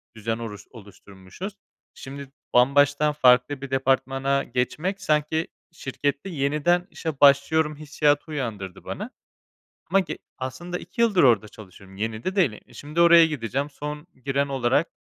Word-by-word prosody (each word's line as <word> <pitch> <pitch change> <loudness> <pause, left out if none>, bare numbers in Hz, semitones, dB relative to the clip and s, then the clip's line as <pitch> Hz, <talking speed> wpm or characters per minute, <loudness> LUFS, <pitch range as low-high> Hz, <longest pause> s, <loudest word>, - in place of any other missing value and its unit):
düzen 115 +1 -3
oruş 110 -4 -8
oluşturmuşuz. 100 - -11 0.4
Şimdi 135 0 -9 0.2
bambaşka 145 +4 +4
farklı 130 0 +3
bir 140 - -6
departmana 135 +1 +1
geçmek, 155 +11 -2
sanki 155 -1 0 0.2
şirkette 145 +2 -3
yeniden 155 +3 +1
işe 160 -5 -5
başlıyorum 150 +2 +4
hissiyatı 150 +1 0
uyandırdı 105 -10 -5
bana. - - -6 0.8
Ama 195 +3 +4
ge 190 - -4 0.2
aslında 175 +7 -5
2 180 +6 -5
yıldır 215 -6 +4
orada 115 -5 +4
çalışıyorum, 95 -2 -14
yeni 110 +2 -4
de 185 +2 -3
değil. 175 - +3 0.2
E, 120 - -19
şimdi 150 +7 -2
oraya 170 -1 +8
gideceğim 140 -1 -3
son 150 +2 -7 0.2
giren 140 +1 +1
olarak, 135 +3 +1
140 Hz, 135 wpm, -24 LUFS, 125-155 Hz, 0.8 s, oraya